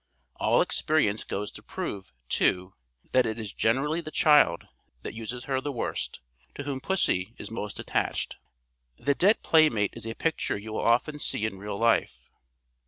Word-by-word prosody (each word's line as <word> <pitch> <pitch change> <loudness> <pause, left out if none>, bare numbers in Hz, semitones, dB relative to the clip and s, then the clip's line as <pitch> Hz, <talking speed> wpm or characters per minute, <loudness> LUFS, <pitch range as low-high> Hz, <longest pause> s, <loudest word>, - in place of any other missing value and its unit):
All - - +3
experience 125 -9 +1
goes 100 +1 -4
to - - -11
prove, 95 -2 -6 0.2
too, 90 +7 +1 0.4
that 130 -2 +4
it 110 0 -2
is 110 -3 -6
generally 145 +8 +1
the 155 - -7
child 150 - +4 0.4
that - - -5
uses 115 +2 -6
her 135 -1 -1
the 145 - -3
worst, 120 - -3 0.3
to 145 - -5
whom 135 -2 -4
pussy 115 - 0
is - - -8
most 105 -2 -5
attached. - - -1 0.6
The 140 - +1
'dead 195 +9 +3
playmate' 150 - +4
is 115 -1 -7
a 115 - -4
picture 165 -9 -1
you 110 +2 -7
will - - -1
often 125 +6 +2
see 110 - 0
in 95 -3 -4
real 100 0 -5
life. 115 - +1
115 Hz, 170 wpm, -27 LUFS, 105-145 Hz, 0.6 s, that